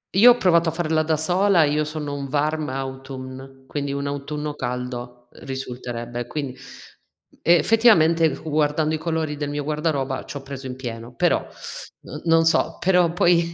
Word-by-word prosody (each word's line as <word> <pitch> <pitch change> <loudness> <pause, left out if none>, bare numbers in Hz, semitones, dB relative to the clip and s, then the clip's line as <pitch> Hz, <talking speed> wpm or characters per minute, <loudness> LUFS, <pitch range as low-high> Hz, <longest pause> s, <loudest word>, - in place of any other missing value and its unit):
Io 230 +5 +8
ho 245 - -7
provato 170 -5 +3
a - - -2
farla 160 -1 0
da 155 0 +1
sola. 180 +2 +3
Io 150 +1 +1
sono 150 -1 -4
un 140 -1 -4
warm 150 0 0
autumn, 130 0 -7
quindi 140 0 -3
un 140 0 -3
autunno 145 +1 -4
caldo 125 -1 -5
risulterebbe. 120 -2 -5
Quindi, 140 -2 -4 0.9
effettivamente, 170 - +4
fu 155 +1 -7
guardando 150 +1 +1
i 155 - -1
colori 160 -2 -2
del 145 -1 -3
mio 145 0 -3
guardaroba, 150 -3 -1
ci 140 - -6
ho 135 - -9
preso 135 -1 -7
in 125 - -5
pieno, 120 -1 -7
però - - +3 0.7
n 150 - -8
non 165 -1 +4
so 165 - +2
però 180 -2 +3
poi 170 -1 +3
150 Hz, 165 wpm, -23 LUFS, 135-160 Hz, 0.9 s, Io